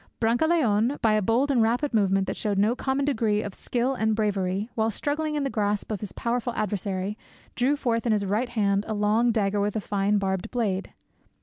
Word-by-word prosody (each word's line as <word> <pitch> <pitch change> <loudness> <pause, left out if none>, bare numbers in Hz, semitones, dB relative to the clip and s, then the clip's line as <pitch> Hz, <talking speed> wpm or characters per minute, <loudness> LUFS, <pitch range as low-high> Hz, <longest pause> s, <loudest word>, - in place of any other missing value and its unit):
Brancaleone, 240 -1 +2
by 220 -2 +4
a 215 - +2
bold 240 +8 +2
and 250 -4 +3
rapid 240 +5 +1
movement 195 -3 +2
that - - -3
showed 205 -2 -1
no 215 +5 +3
common 270 +1 -1
degree 220 -6 +1
of 205 - -6
skill 245 +6 -1
and 220 -4 0
bravery, 200 -2 -1
while 220 0 +1
struggling 300 +6 -2
in 295 - 0
the 275 - -1
grasp 205 -1 -1
of 210 - -2
his 205 -1 -6
powerful 240 0 -2
adversary, 200 0 -2 0.3
drew 260 +4 +2
forth 240 -4 -1
in - - +2
his 210 -2 +1
right 215 +6 0
hand 200 -4 +1
a 220 - -2
long 215 +3 +2
dagger 205 -2 0
with 205 +1 -1
a - - +1
fine 205 0 0
barbed 190 -2 -2
blade. 205 -6 -2
220 Hz, 205 wpm, -26 LUFS, 205-245 Hz, 0.3 s, by